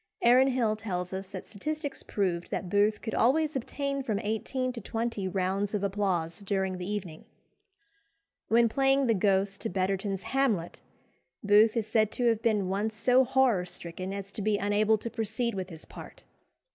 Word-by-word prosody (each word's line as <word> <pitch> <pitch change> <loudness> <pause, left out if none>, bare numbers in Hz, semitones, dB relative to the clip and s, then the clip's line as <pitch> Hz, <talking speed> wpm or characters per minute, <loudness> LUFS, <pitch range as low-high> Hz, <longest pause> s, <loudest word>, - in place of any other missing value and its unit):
Aaron 250 +3 +6
Hill 240 -5 +1
tells 180 -4 -4
us 190 0 -4
that 190 -1 -8
statistics 290 +6 -4
proved 180 -5 -2
that 180 - -3
Booth 205 +2 +2
could 220 - -4
always 305 +5 +2
obtain 275 +2 -2
from 220 -6 -1
eighteen 255 +4 -2
to 235 - -7
twenty 225 -2 -3
rounds 195 +2 -1
of 200 - -2
applause 190 -5 -1
during 190 -2 -2
the 180 +2 -5
evening. 185 -6 -5 1.2
When 235 +1 +4
playing 270 +3 +2
the 230 - +3
Ghost 195 0 +1
to 225 - -2
Betterton's 195 +1 -1
Hamlet, 240 -11 0 0.6
Booth 210 +3 +5
is 225 - 0
said 215 -1 +2
to 245 - -1
have 225 -1 0
been 215 -4 +1
once 205 +4 -1
so 250 +4 +4
horror 260 -7 +2
stricken 180 +1 -6
as 200 0 -6
to 210 - -5
be 210 0 +1
unable 205 +2 +2
to 230 - -5
proceed 225 +1 -1
with 190 -1 -4
his 160 -3 -9
part. - - -12
210 Hz, 170 wpm, -29 LUFS, 190-235 Hz, 1.2 s, Aaron